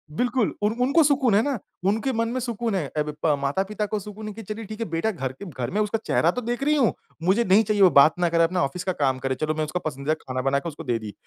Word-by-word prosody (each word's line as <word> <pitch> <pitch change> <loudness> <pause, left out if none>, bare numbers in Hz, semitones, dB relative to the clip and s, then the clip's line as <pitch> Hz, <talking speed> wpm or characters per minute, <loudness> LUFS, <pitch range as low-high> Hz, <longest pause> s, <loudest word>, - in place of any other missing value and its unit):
बिल्कुल 245 +1 +1
उन 210 +1 +2
उनको 280 +6 +4
सुकून 270 -6 +3
है 210 - +5
ना, 280 -1 -1 0.3
उनके 220 +6 +1
मन 230 0 0
में 255 +2 -2
सुकून 235 -3 -2
है, 165 -7 -1
अब 150 0 0 0.2
ब 150 -2 +4
माता-पिता 190 +10 -1
को 210 +1 -2
सुकून 210 +2 -8
है 215 - -5
कि 225 - -9
चलिए 215 +2 -6
ठीक 215 +2 -8
है 230 - -1
बेटा 165 +7 0
घर 135 -10 -4
के 130 +10 -11
घर 130 -9 -5
में, 205 - -1
उसका 210 +1 0
चेहरा - - +3
तो 250 - -4
देख 240 +3 -3
रही 300 +2 +3
हूँ। 265 -6 +3 0.3
मुझे 190 +7 +3
नहीं 200 +2 +5
चाहिए, 210 -1 0
वो 185 - +8
बात 155 +2 +5
ना 175 -1 +2
करे, 165 0 +3
अपना 180 +2 +1
ऑफ़िस 175 +6 -3
का 185 - 0
काम 130 -2 +2
करे, 130 0 -1
चलो 155 +3 -1
मैं 155 - -1
उसका 165 +4 -3
पसंदीदा 145 0 -1
खाना 130 0 -3
बना 135 +1 +1
के 170 - -5
उसको 155 +1 -9
दे 120 -5 0
दी 105 -2 -8
195 Hz, 290 wpm, -24 LUFS, 150-225 Hz, 0.3 s, वो